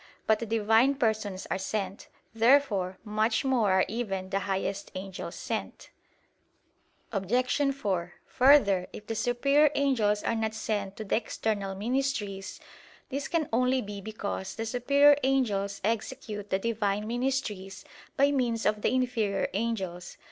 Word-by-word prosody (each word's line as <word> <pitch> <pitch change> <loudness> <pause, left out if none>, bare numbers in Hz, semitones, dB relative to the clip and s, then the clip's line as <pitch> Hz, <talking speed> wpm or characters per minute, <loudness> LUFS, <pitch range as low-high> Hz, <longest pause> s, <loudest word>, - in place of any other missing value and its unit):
But 220 -1 +3
the 230 - -4
Divine 225 +5 +3
Persons 215 -6 -1
are - - 0
sent. 195 0 -4 0.3
Therefore 225 -6 +3
much 220 +3 0
more 240 -7 +2
are 190 0 +4
even 195 -5 -3
the 195 - +1
highest 195 0 -3
angels 190 0 -6
sent. - - -5 1.2
Obj. 250 +7 +1
4: 185 -9 -2
Further, 245 -9 +4
if 210 - -9
the 225 - -3
superior 275 +6 +3
angels 225 -7 +2
are - - 0
not 220 -1 -1
sent 205 -3 -3
to 220 - -4
the 210 - +1
external 210 -3 -2
ministries, 215 -3 -2 0.5
this 280 +1 -3
can 330 -4 0
only 255 +2 +3
be 205 -1 -7
because 200 -2 -5
the 225 - -3
superior 280 +5 +4
angels 210 -7 0
execute 210 -1 -3
the 190 - +2
Divine 210 -1 -1
ministries 230 -5 -3 0.3
by 280 +1 +4
means 240 -5 0
of 210 0 +1
the - - +2
inferior 240 -6 0
angels. 190 -5 -3
220 Hz, 140 wpm, -28 LUFS, 200-250 Hz, 1.2 s, are